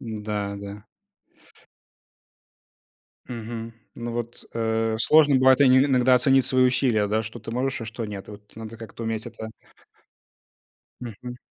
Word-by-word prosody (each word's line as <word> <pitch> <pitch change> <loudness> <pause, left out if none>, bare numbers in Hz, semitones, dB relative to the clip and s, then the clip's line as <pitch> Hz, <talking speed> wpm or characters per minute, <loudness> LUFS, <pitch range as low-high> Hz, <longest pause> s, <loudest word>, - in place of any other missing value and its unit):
М-да, 105 -3 -4
да. 100 +1 -9 2.5
Мгм, 115 -1 -6 0.2
ну 120 0 -5
вот, 120 0 -5
э, 115 -1 0
сложно 150 0 +5
бывает 130 +1 +5
инь 130 -1 +6
иногда 130 -2 +4
оценить 135 +1 +4
свои 130 -1 +4
усилия, 125 -5 +2
да, 110 +2 0
что 110 +2 -8
ты 115 - -8
можешь, 130 +3 -2
а - - -5
что 115 +1 -6
нет. 105 -2 -7
И - - -8
вот 105 0 -12
надо 110 0 -9
как-то 115 0 -9
уметь 110 -1 -3
это 110 0 -8 1.5
Мгм. 125 +1 -8
115 Hz, 140 wpm, -24 LUFS, 110-125 Hz, 2.5 s, инь